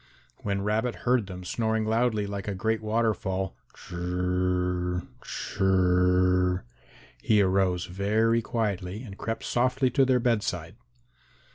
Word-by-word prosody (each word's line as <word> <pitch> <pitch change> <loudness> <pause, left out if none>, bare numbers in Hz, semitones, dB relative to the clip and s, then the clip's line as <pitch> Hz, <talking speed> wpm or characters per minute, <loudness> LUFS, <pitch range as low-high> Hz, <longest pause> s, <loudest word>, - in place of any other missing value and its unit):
When 100 -1 -2
Rabbit 110 +4 0
heard 125 -4 +2
them 90 -1 -7
snoring 110 +3 0
loudly 110 -1 +1
like 100 0 -5
a 100 - -2
great 110 +3 0
waterfall, 105 -4 -1 0.2
"chr - - -13
r 90 0 0
r, 90 - -1 0.2
chr - - -5
r 95 0 +4 0.8
r," 90 - -5 0.6
he 110 -2 +3
arose 95 -2 +2
very 110 +5 +1
quietly 105 -3 -2
and 100 -6 -9
crept 115 +2 -4
softly 130 +1 +1
to 135 +2 +4
their 130 -1 +3
bedside. 105 -7 -1
105 Hz, 135 wpm, -27 LUFS, 90-115 Hz, 0.8 s, r